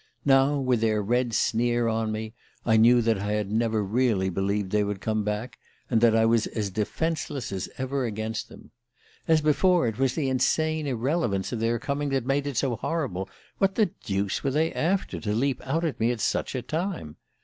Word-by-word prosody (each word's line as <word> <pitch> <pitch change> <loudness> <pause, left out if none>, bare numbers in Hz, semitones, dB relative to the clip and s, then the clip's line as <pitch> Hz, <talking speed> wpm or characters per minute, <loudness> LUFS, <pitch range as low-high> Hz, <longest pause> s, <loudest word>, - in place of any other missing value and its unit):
Now, 135 +1 +4
with 130 -4 +1
their 110 -1 +2
red 120 +4 0
sneer 120 +1 +1
on 110 -1 0
me, 110 0 -4 0.3
I 110 - +4
knew 120 +2 +6
that 110 -3 +1
I 105 +1 -2
had 105 -1 -2
never 110 -1 +1
really 105 -3 +1
believed 95 +1 -1
they 105 0 +2
would 100 -1 -3
come 110 +2 -1
back, 105 +4 -4 0.3
and 115 -2 +3
that 115 -2 +5
I 115 0 +4
was 115 -1 +3
as 105 -3 -3
defenceless 135 - -2
as 95 -1 -4
ever 130 0 -1
against 110 +1 -4
them... - - -15 0.6
As 160 -2 +4
before, 170 +2 +3
it 110 0 -4
was 135 -2 +1
the 145 -4 0
insane 155 +4 +1
irrelevance 125 - -1
of 120 - -3
their 115 +1 +1
coming 140 +4 -2
that 135 -3 -1
made 140 +1 0
it 140 -4 -4
so 125 -4 0
horrible. 110 - -3 0.3
What 195 0 +2
the 215 -6 +2
deuce 100 -1 -1
were 140 - +1
they 155 +4 +1
after, 190 +4 -1
to 105 -2 -2
leap 130 +2 0
out 165 +5 0
at 140 -7 -3
me 115 - +2
at 120 -2 -1
such - - -1
a 125 - -3
time? 160 - -4
120 Hz, 205 wpm, -26 LUFS, 110-140 Hz, 0.6 s, knew